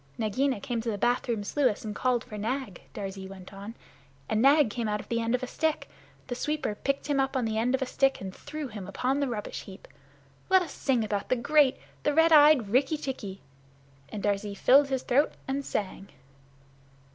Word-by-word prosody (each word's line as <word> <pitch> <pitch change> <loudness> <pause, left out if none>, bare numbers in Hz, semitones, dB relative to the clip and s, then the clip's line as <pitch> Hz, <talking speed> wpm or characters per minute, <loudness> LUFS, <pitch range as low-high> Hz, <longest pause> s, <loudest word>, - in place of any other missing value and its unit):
"Nagaina 235 +3 0
came 240 -1 -3
to 230 - -3
the 210 - -2
bathroom 240 -1 0
sluice 245 -1 0
and 210 - -4
called 250 0 0
for 215 - -10
Nag," 220 -2 -3
Darzee 195 -2 -6
went 190 0 -11
on, 200 +4 -8 0.5
"and 220 - +1
Nag 280 -2 +5
came 235 0 -2
out 210 0 -1
on - - -8
the 230 0 +1
end 230 +2 +1
of 250 - -3
a - - 0
stick 315 +4 -1 0.4
the 250 - -4
sweeper 300 -2 -2
picked 275 +6 -2
him 285 -2 0
up 270 0 +1
on 250 - 0
the 220 0 -1
end 250 +3 +2
of 265 - -1
a - - -2
stick 270 +1 +1
and 190 -1 -6
threw 300 0 -6
him 205 -5 -8
upon 255 +7 -1
the 280 - +1
rubbish 220 -4 -5
heap. 190 -1 -12 0.6
Let 375 -1 +5
us 340 - -8
sing 255 -5 +1
about 205 -2 -3
the 255 - +3
great, 280 +2 +3 0.2
the 295 - 0
red 325 +1 +5
eyed 295 -7 +7
Rikki 265 +7 +2
tikki!" 225 -10 -6 0.7
And 205 - -6
Darzee 205 0 -1
filled 275 +7 +5
his 265 -2 -2
throat 280 +5 +2
and 275 +1 -2
sang. 195 -5 -4
245 Hz, 205 wpm, -28 LUFS, 210-275 Hz, 0.7 s, eyed